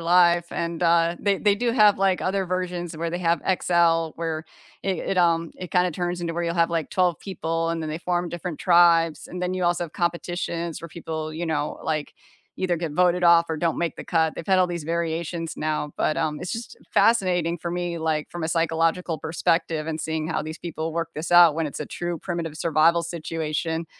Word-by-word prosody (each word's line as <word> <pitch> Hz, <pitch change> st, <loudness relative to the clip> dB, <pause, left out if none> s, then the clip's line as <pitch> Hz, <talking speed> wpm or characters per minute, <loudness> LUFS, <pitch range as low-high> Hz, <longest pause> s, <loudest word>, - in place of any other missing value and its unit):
life 175 Hz, 0 st, +4 dB
and, 170 Hz, 0 st, -3 dB
uh, 170 Hz, 0 st, +3 dB
they 200 Hz, -2 st, +1 dB
they 205 Hz, -1 st, +3 dB
do 235 Hz, +1 st, 0 dB
have 210 Hz, -4 st, +5 dB
like 190 Hz, -1 st, +2 dB
other 190 Hz, 0 st, 0 dB
versions 180 Hz, -2 st, -3 dB
where 165 Hz, +1 st, -2 dB
they 175 Hz, -, -3 dB
have 170 Hz, -1 st, +1 dB
XL 170 Hz, -3 st, +2 dB
where 160 Hz, -1 st, -3 dB, 0.4 s
it 190 Hz, -3 st, -1 dB
it, 190 Hz, -, -1 dB
um 165 Hz, -1 st, +2 dB
it 180 Hz, -1 st, -7 dB
kinda 180 Hz, 0 st, +3 dB
turns 175 Hz, +1 st, -3 dB
into 170 Hz, -1 st, -2 dB
where 170 Hz, +1 st, -1 dB
you'll 170 Hz, 0 st, -1 dB
have 170 Hz, 0 st, +2 dB
like 165 Hz, -2 st, -1 dB
12 180 Hz, -3 st, +1 dB
people 165 Hz, -3 st, -2 dB
and 165 Hz, -1 st, -2 dB
then 155 Hz, -, -4 dB
they 155 Hz, -, -4 dB
form 175 Hz, 0 st, -1 dB
different 175 Hz, -1 st, -5 dB
tribes 170 Hz, -2 st, +4 dB
and 180 Hz, 0 st, -6 dB
then 180 Hz, 0 st, -1 dB
you 185 Hz, -1 st, -1 dB
also 175 Hz, 0 st, +1 dB
have 160 Hz, -, -11 dB
competitions 170 Hz, -1 st, -2 dB
where 170 Hz, -, -8 dB
people, 160 Hz, -1 st, -5 dB
you 170 Hz, +2 st, -3 dB
know, 150 Hz, -2 st, -2 dB
like 155 Hz, -2 st, -2 dB, 0.4 s
either 180 Hz, -2 st, 0 dB
get 165 Hz, -1 st, -3 dB
voted 180 Hz, +2 st, +2 dB
off 170 Hz, -1 st, +6 dB
or 160 Hz, -, -2 dB
don't 165 Hz, +1 st, 0 dB
make 170 Hz, -1 st, -1 dB
the -, -, -8 dB
cut, 160 Hz, -2 st, +1 dB
they've -, -, -7 dB
had 190 Hz, -2 st, +4 dB
all 185 Hz, -, +4 dB
these 170 Hz, -3 st, -5 dB
variations 165 Hz, 0 st, -2 dB
now, 155 Hz, -1 st, -2 dB
but, 155 Hz, -, 0 dB
um, 155 Hz, -2 st, -1 dB
it's 180 Hz, -, -4 dB
just 230 Hz, 0 st, -6 dB, 0.2 s
fascinating 180 Hz, -7 st, +3 dB
for 170 Hz, +1 st, -5 dB
me 175 Hz, 0 st, -2 dB
like 160 Hz, -2 st, -1 dB
from 175 Hz, -, -6 dB
a 160 Hz, -, -1 dB
psychological 165 Hz, +1 st, +1 dB
perspective 165 Hz, -1 st, 0 dB
and 160 Hz, -1 st, -3 dB
seeing 160 Hz, 0 st, -2 dB
how 165 Hz, -, -1 dB
these 155 Hz, +1 st, -7 dB
people 165 Hz, -1 st, -4 dB
work 165 Hz, -1 st, -2 dB
this 155 Hz, +2 st, -4 dB
out 175 Hz, -3 st, +8 dB
when 165 Hz, 0 st, -1 dB
it's 145 Hz, -, -6 dB
a 150 Hz, -, -4 dB
true 175 Hz, -1 st, -4 dB
primitive 170 Hz, -3 st, -4 dB
survival 165 Hz, +1 st, +3 dB
situation. 165 Hz, 0 st, -3 dB
170 Hz, 220 wpm, -24 LUFS, 160-175 Hz, 0.4 s, out